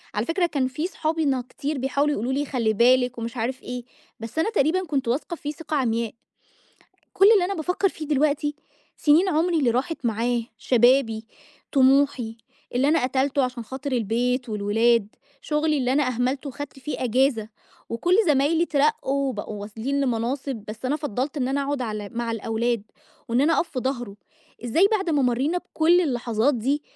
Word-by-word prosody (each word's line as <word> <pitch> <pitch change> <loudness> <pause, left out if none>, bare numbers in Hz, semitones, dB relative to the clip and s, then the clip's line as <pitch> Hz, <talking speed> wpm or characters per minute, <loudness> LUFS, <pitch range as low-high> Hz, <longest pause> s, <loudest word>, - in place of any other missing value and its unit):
على 210 - 0
فكرة 345 +4 +1
كان 275 -6 0
في 300 +7 -3
صحابي 320 -2 -1
نا 265 -3 +1
كتير 290 0 -4
بيحاولوا 280 +3 +1
يقولوا 245 +1 -2
لي 285 +2 0
خلّي 235 -6 0
بالِك 250 +2 +3
ومش 230 +2 -5
عارف 255 +3 -3
إيه، 245 0 -5 0.4
بس 225 +7 -5
أنا 325 - +2
تقريبًا 370 0 +1
كنت 275 -4 -1
واثقة 275 +8 -1
فيه 295 -2 -5
ثقة 310 0 -5
عمياء. 230 -3 0 1.0
كُل 395 +3 +7
اللي 400 -5 +4
أنا 390 +2 -2
بافكّر 360 +4 0
في 315 -3 -8
دلوقتي 295 0 +1 0.4
سنين 320 +6 +4
عمري 335 +1 +2
اللي 265 -6 +2
راحت 265 +5 -2
معاه، 235 +2 0 0.2
شبابي، 240 -2 +3 0.5
طموحي، 265 -4 +3 0.4
اللي 260 +3 +2
أنا 320 -1 +3
قتلته 270 +2 +1
عشان 250 -2 -4
خاطر 270 +4 -6
البيت 245 +2 0
والولاد، 215 +1 +2 0.3
شغلي 300 0 0
اللي 255 -1 +1
أنا 290 +2 +3
أهملته 255 +3 -1
وخدت 285 +1 -8
فيه 270 0 -4
أجازة، 245 -2 +1 0.4
وكُل 345 +11 +1
زمايلي 300 +3 +3
اترقوا 280 -3 +1
وبقوا 210 -3 -5
واصلين 225 +7 -3
لمناصب، 250 -1 -2
بس 215 +4 -8
أنا 285 +4 +1
فضّلت 285 0 -3
إن 255 -3 0
أنا 280 +1 0
أقعد 280 -1 -2
على 215 -3 -4
مع 235 0 -2
الأولاد، 225 0 -1 0.5
وإن 235 +2 +2
أنا 315 +3 +3
أقف 345 - 0
في 265 - -4
ضهره. 245 -6 -3 0.5
إزاي 325 - +4
بعد 380 -4 -2
ما 290 -3 +2
مرينا 260 +8 +1
بكل 345 +1 +2
اللحظات 245 -3 +1
دي، 270 +6 -1
265 Hz, 170 wpm, -24 LUFS, 235-295 Hz, 1.0 s, كُل